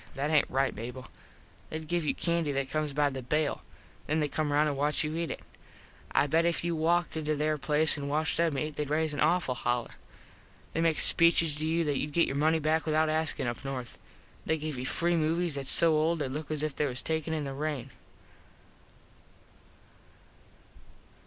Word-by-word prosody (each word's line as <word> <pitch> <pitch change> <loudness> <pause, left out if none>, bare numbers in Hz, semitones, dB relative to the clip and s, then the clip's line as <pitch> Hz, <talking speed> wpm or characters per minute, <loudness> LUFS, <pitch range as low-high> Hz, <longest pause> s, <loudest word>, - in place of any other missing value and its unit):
That 145 +3 -1
aint 150 -2 +4
right, 135 +1 +1
Mable. 125 +4 -8 0.6
They 155 - -4
give 165 +2 -2
you - - +1
candy 170 -3 0
that 135 -1 -2
comes 155 -1 -1
by 145 0 +1
the 135 0 -5
bale. 150 +4 -1 0.5
Then 155 +1 +1
they 150 - +1
come 150 +1 -2
round 150 +1 +3
an 145 - -1
watch 150 +3 +1
you 155 +1 -3
eat 170 0 -2
it. - - -5 0.7
I - - +3
bet 160 +3 +2
if 170 -1 +1
you 170 -1 -1
walked 170 +2 +1
into 155 -1 -1
there 150 +1 0
place 150 +2 +4
an 140 -1 -4
watched 155 +2 0
them 165 -4 +1
eat 155 +2 -3
theyd 150 -1 -2
raise 155 0 0
an 145 - -4
awful 155 -3 +2
holler. 120 -1 -2 0.8
They 165 - 0
make 165 -2 +2
speeches 165 -2 +4
to 155 +1 -2
you 165 +1 +1
that 145 -3 0
youd 150 0 -4
get 170 - +4
your 135 - -3
money 155 +3 +3
back 160 +1 0
without 155 0 +2
askin 155 -3 -1
up 120 +2 -4
north. 130 -3 -6 0.4
They 160 - 0
give 155 -1 -4
you 125 +1 -4
free 170 +4 +1
movies 165 +1 0
thats 140 -1 -2
so 165 -2 +5
old 160 +2 +2
they 145 - -2
look 150 +4 -5
as 155 -1 -2
if 155 -2 -2
they 150 - 0
was 125 -1 -3
taken 160 0 -2
in 155 -2 -1
the 135 -1 -4
rain. 140 -3 -4
155 Hz, 205 wpm, -29 LUFS, 140-160 Hz, 0.8 s, so